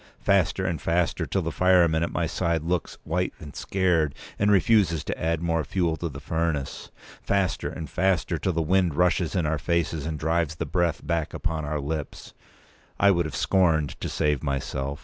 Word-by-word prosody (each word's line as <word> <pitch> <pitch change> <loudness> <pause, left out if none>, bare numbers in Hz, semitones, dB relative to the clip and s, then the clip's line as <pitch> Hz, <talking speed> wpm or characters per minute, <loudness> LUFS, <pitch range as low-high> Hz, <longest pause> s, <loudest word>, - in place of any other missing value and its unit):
Faster 95 -1 +2
and 85 -5 -2
faster, 85 0 0
till 95 - -1
the 80 - -2
fireman 85 -2 +4
at 85 - -1
my 85 - 0
side 85 -1 -1
looks 85 0 -2
white 90 +3 -1
and 75 -2 -10
scared, 90 -6 +1 0.2
and 105 - +3
refuses 95 -5 +3
to - - -3
add 85 0 0
more 80 -1 +1
fuel 85 +2 0
to 85 - -3
the 70 -1 -8
furnace. 75 -1 -2 0.3
Faster 100 -3 0
and 80 - -6
faster, 95 -3 0
till 95 - 0
the 85 0 0
wind 90 -1 +2
rushes 90 +1 +2
in 90 -4 +1
our 75 0 0
faces 80 -1 -1
and 80 -1 -3
drives 80 0 0
the 80 - -3
breath 85 +1 0
back 85 -2 -1
upon 80 -2 -2
our 75 +1 -2
lips. 75 0 -5 0.7
I 100 - +6
would 85 -3 +1
have 80 - -5
scorned 80 -6 +2
to - - -2
save 75 -2 0
myself. 70 0 -3
85 Hz, 190 wpm, -26 LUFS, 75-90 Hz, 0.7 s, I